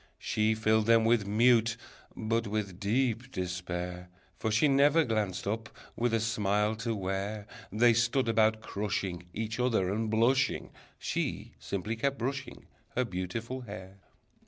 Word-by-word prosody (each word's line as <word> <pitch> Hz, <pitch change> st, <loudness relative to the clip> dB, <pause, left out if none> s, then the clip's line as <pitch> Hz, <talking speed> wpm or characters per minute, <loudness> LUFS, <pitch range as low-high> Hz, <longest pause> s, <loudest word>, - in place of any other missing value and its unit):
She 110 Hz, +1 st, +1 dB
filled 110 Hz, 0 st, +2 dB
them 115 Hz, -1 st, +5 dB
with 115 Hz, -3 st, +3 dB
mute, 115 Hz, +1 st, +4 dB, 0.4 s
but 115 Hz, 0 st, -1 dB
with 100 Hz, -3 st, -3 dB
deep 120 Hz, +3 st, 0 dB
despair, 90 Hz, -1 st, -4 dB, 0.3 s
For 110 Hz, -, -2 dB
she 110 Hz, +8 st, +4 dB
never 145 Hz, +3 st, +5 dB
glanced 105 Hz, -6 st, -1 dB
up, 110 Hz, +2 st, -2 dB, 0.3 s
with 120 Hz, 0 st, +1 dB
a -, -, +2 dB
smile, 105 Hz, -1 st, +1 dB
to 115 Hz, +1 st, -2 dB
where 100 Hz, +2 st, -3 dB, 0.3 s
They 115 Hz, +3 st, +5 dB
stood 120 Hz, +2 st, +2 dB
about, 110 Hz, -1 st, +3 dB
crushing 95 Hz, -5 st, -3 dB
Each 110 Hz, +3 st, -4 dB
other, 110 Hz, -7 st, +2 dB
and 110 Hz, +1 st, -1 dB
blushing: 130 Hz, +4 st, +2 dB, 0.3 s
She -, -, -3 dB
simply 100 Hz, +3 st, -3 dB
kept 140 Hz, +4 st, -1 dB
brushing 130 Hz, +2 st, -4 dB, 0.3 s
Her 125 Hz, -, +2 dB
beautiful 115 Hz, +6 st, -4 dB
hair. 100 Hz, -4 st, -9 dB
110 Hz, 140 wpm, -30 LUFS, 100-115 Hz, 0.4 s, them